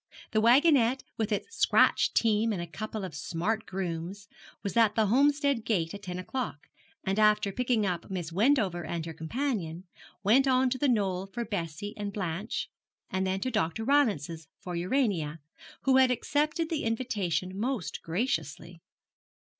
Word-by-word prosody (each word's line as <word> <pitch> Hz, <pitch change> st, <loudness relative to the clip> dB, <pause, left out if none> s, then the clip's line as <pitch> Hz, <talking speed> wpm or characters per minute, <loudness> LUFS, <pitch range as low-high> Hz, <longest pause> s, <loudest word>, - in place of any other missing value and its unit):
The 215 Hz, -, +2 dB
wagonette 260 Hz, +1 st, +5 dB
with 220 Hz, -1 st, -1 dB
its 215 Hz, -, -2 dB
scratch -, -, +4 dB
team 225 Hz, 0 st, +3 dB
and 200 Hz, -, -2 dB
a 170 Hz, -, -3 dB
couple 215 Hz, +4 st, -5 dB
of 180 Hz, -, -7 dB
smart 180 Hz, +9 st, -2 dB
grooms, 185 Hz, +1 st, -4 dB, 0.4 s
was 200 Hz, -, -3 dB
at 225 Hz, -3 st, +4 dB
the 220 Hz, -, +3 dB
Homestead 280 Hz, +2 st, +3 dB
gate 170 Hz, -8 st, 0 dB
at 205 Hz, -, -7 dB
ten 180 Hz, -2 st, -5 dB
o'clock, 185 Hz, -, -4 dB, 0.4 s
and 195 Hz, +2 st, 0 dB
after 210 Hz, -1 st, +4 dB
picking 240 Hz, -1 st, +1 dB
up 180 Hz, -3 st, -3 dB
Miss 175 Hz, -4 st, -4 dB
Wendover 200 Hz, -3 st, +2 dB
and 165 Hz, 0 st, -4 dB
her 165 Hz, -, -6 dB
companion, 175 Hz, -, -3 dB, 0.4 s
went 250 Hz, +7 st, +5 dB
on 260 Hz, -1 st, +3 dB
to 260 Hz, -, -1 dB
The 290 Hz, -, +2 dB
Knoll 195 Hz, -5 st, 0 dB
for 235 Hz, +4 st, -4 dB
Bessie 200 Hz, -1 st, -4 dB
and 205 Hz, -1 st, -3 dB
Blanche, 195 Hz, +1 st, -3 dB, 0.4 s
and 190 Hz, -1 st, 0 dB
then 190 Hz, +1 st, -1 dB
to 255 Hz, -, -1 dB
Dr. 215 Hz, -1 st, -1 dB
Rylance's 200 Hz, -, +1 dB
for 180 Hz, -1 st, -6 dB
Urania, 175 Hz, -, 0 dB, 0.5 s
who 265 Hz, -1 st, +4 dB
had 260 Hz, -1 st, +6 dB
accepted 300 Hz, +6 st, 0 dB
the 315 Hz, -, -1 dB
invitation 200 Hz, -7 st, -1 dB
most 235 Hz, -1 st, -2 dB
graciously. 170 Hz, -, -3 dB
205 Hz, 160 wpm, -29 LUFS, 175-245 Hz, 0.5 s, had